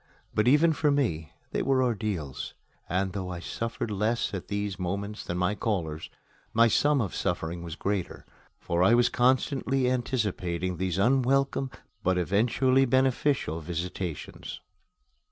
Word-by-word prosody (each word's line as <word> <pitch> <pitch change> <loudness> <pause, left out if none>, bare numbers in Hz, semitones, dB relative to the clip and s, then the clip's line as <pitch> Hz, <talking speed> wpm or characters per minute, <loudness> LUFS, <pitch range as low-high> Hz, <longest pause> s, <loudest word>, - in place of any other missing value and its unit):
But 105 - +2
even 155 +5 +5
for 150 0 +1
me 105 - 0 0.2
they - - 0
were 130 -1 +2
ordeals; 100 - -2 0.3
and 95 +2 0
though 95 -3 -4
I 90 -1 -5
suffered 115 +4 -4
less 110 +3 0
at 95 - -5
these 100 -2 -3
moments 100 +3 -3
than 85 - -3
my 90 +3 +1
callers, 85 -8 -2 0.5
my 115 +1 +6
sum 145 +5 +3
of 100 - -3
suffering 85 -2 -2
was 85 -2 -6
greater, 100 0 -3 0.3
for 85 0 -1
I 95 +6 +6
was 120 0 +4
constantly 130 +1 +2
anticipating 95 -8 -1
these 90 0 -1
unwelcome, 135 +4 +2 0.3
but 95 0 +1
eventually 120 +8 +3
beneficial, 130 - +1
visitations. 85 +1 -5
105 Hz, 135 wpm, -28 LUFS, 90-130 Hz, 0.5 s, my